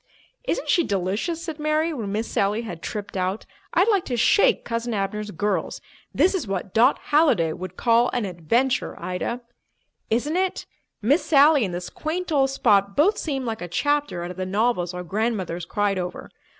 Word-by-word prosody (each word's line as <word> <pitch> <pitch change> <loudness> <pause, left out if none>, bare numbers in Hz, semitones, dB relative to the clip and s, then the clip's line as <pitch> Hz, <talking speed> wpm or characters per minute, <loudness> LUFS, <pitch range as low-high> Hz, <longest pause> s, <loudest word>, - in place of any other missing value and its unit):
"Isn't - - -2
she 345 - +3
delicious?" 205 - -2
said 320 -2 -6
Mary, 305 +2 +1
when 220 -8 -4
Miss 215 +3 -2
Sally 205 +4 0
had 175 -7 -7
tripped 210 -1 -6
out. 185 +2 -2 0.3
"I'd 380 - +4
like 400 -5 +3
to 245 - -2
shake 240 - +3
Cousin 230 0 -2
Abner's 210 +1 -2
girls. 195 -1 -2 0.3
This 375 - +3
is 340 - -2
what 195 -1 -4
Dot 245 +5 +5
Halliday 255 - +2
would 185 +1 -8
call 235 +1 +3
an 245 -4 -1
adventure, 225 +9 0
Ida." 185 +7 -3 0.7
"Isn't 285 +9 0
it! 375 0 -1 0.4
Miss 280 - +3
Sally 290 -2 +5
and 180 - -5
this 180 0 -6
quaint 345 +3 -4
old 270 -3 +3
spot 200 -7 +2
both 375 +9 +3
seem 270 -4 -3
like 225 -1 -4
a 175 - -4
chapter 290 - 0
out 175 - -5
of 180 - -10
the 185 - -2
novels 200 -3 0
our 180 - -5
grandmothers 190 -3 -2
cried 200 +1 0
over. 180 0 -6
225 Hz, 180 wpm, -24 LUFS, 190-290 Hz, 0.7 s, Dot